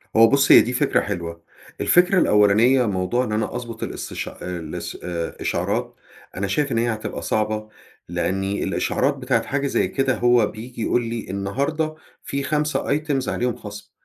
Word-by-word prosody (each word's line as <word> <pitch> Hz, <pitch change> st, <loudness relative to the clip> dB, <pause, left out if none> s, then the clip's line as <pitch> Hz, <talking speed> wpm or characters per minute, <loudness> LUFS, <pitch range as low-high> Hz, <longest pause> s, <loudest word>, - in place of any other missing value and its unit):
هو 115 Hz, +1 st, +8 dB
بُصّ، 140 Hz, +2 st, +4 dB
هي -, -, +10 dB
دي 125 Hz, -, -2 dB
فكرة 125 Hz, -, +2 dB
حلوة. 85 Hz, -4 st, -5 dB, 0.4 s
الفكرة 180 Hz, +2 st, +4 dB
الأولانية 110 Hz, -, +4 dB
موضوع 100 Hz, +4 st, 0 dB
إن 110 Hz, -, -5 dB
أنا 110 Hz, +2 st, -1 dB
أظبُط 120 Hz, -2 st, -6 dB
الاستش -, -, -5 dB
آآ، 90 Hz, -1 st, -6 dB
الاس 80 Hz, -2 st, -6 dB
آآ، 85 Hz, -2 st, -3 dB
الإشعارات -, -, -2 dB, 0.4 s
أنا 100 Hz, +1 st, -1 dB
شايف 145 Hz, +8 st, 0 dB
إن 115 Hz, -, 0 dB
هي 115 Hz, 0 st, +1 dB
هتبقى 110 Hz, -, -5 dB
صعبة، 110 Hz, 0 st, -1 dB, 0.4 s
لأني 95 Hz, +3 st, -1 dB
الإشعارات 140 Hz, +3 st, 0 dB
بتاعة 125 Hz, -3 st, 0 dB
حاجة 140 Hz, +3 st, -1 dB
زي -, -, +1 dB
كده 135 Hz, -1 st, 0 dB
هو 120 Hz, -1 st, +4 dB
بييجي 115 Hz, +3 st, -8 dB
يقول 120 Hz, +2 st, +1 dB
لي 115 Hz, -1 st, -5 dB
النهاردة 140 Hz, +12 st, -2 dB, 0.3 s
في 140 Hz, 0 st, -3 dB
5 150 Hz, -1 st, 0 dB
items 145 Hz, -4 st, -2 dB
عليهم 125 Hz, -1 st, -1 dB
خَصم 105 Hz, -3 st, -10 dB
115 Hz, 165 wpm, -22 LUFS, 100-135 Hz, 0.4 s, هي